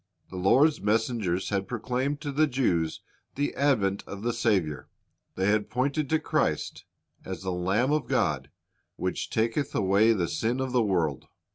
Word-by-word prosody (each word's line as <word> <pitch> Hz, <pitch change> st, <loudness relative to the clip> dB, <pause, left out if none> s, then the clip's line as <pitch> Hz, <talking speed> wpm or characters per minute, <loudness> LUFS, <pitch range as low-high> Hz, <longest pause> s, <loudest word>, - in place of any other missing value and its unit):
The -, -, -8 dB
Lord's 135 Hz, -, +3 dB
messengers 105 Hz, -3 st, 0 dB
had 100 Hz, -1 st, -1 dB
proclaimed 125 Hz, +5 st, -2 dB
to 145 Hz, -2 st, -3 dB
the 155 Hz, +3 st, +3 dB
Jews 90 Hz, -, 0 dB, 0.3 s
the 145 Hz, +1 st, -1 dB
advent 110 Hz, -9 st, +1 dB
of 100 Hz, +1 st, -7 dB
the 120 Hz, 0 st, 0 dB
Saviour; 100 Hz, -11 st, 0 dB, 0.5 s
they 95 Hz, -, 0 dB
had 105 Hz, -1 st, 0 dB
pointed 140 Hz, +4 st, -1 dB
to 160 Hz, -, +3 dB
Christ -, -, -1 dB, 0.4 s
as 95 Hz, -2 st, -6 dB
"the 95 Hz, -, -2 dB
Lamb 95 Hz, +9 st, +1 dB
of 150 Hz, -4 st, 0 dB
God, -, -, 0 dB, 0.5 s
which -, -, -3 dB
taketh 115 Hz, +5 st, -1 dB
away 100 Hz, +3 st, +4 dB
the 90 Hz, -5 st, 0 dB
sin 120 Hz, +8 st, -1 dB
of 130 Hz, -1 st, -2 dB
the 125 Hz, -1 st, +3 dB
world." 85 Hz, -, 0 dB
110 Hz, 160 wpm, -27 LUFS, 95-130 Hz, 0.5 s, away